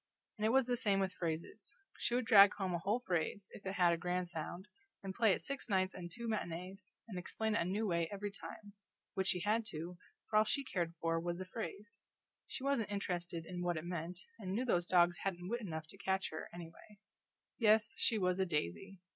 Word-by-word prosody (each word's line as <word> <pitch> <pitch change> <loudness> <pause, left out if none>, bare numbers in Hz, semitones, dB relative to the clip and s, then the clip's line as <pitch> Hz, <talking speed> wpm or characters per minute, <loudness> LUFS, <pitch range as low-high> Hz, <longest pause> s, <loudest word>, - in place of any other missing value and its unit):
And 215 - +1
it - - +3
was 265 +2 +5
the 245 0 0
same 200 -3 +2
with 190 -1 0
phrases. 170 +9 -4 0.2
She 240 - +1
would 250 -1 +1
drag 200 -3 +9
home 190 -3 -1
a 175 - 0
whole 205 +7 +1
phrase, 185 0 -1
if 195 - -9
it 190 - -1
had 175 -2 +5
a - - 0
grand 180 +1 -1
sound, 175 +3 -5 0.4
and 190 -1 -4
play 225 0 +4
it - - 0
six 275 -3 -4
nights 190 -1 +2
and 175 -1 -6
two 235 +7 -5
matinees, 185 -1 -4
and 190 -5 -4
explain 220 +4 -1
it 210 - +2
a - - +1
new 200 +5 0
way 170 -4 +1
every 205 0 -3
time 205 0 -9 0.4
which 190 0 0
she 180 - +2
had 215 +4 +2
to, 170 0 -6 0.3
for 215 - +2
all 215 - +7
she 275 +6 0
cared 170 -9 -2
for 165 0 +1
was 170 +1 -2
the 185 - -5
phrase; 215 +2 -6 0.5
she - - -5
wasn't 275 -6 +1
interested 175 -4 -2
in 180 0 -5
what 175 -2 0
it 155 - -4
meant, 175 0 -3 0.2
and 190 -3 -3
knew 240 +5 0
those 175 -7 +2
dogs 175 -1 +5
hadn't 180 -2 -2
wit 240 +2 -1
enough 160 -6 -4
to 180 +5 -11
catch 190 -1 0
her, 155 - -5
anyway. 170 +4 -11 0.6
Yes, 220 -1 +5
she 225 - +3
was 180 -2 +1
a 190 - +3
daisy! 170 - -2
190 Hz, 220 wpm, -36 LUFS, 175-210 Hz, 0.6 s, drag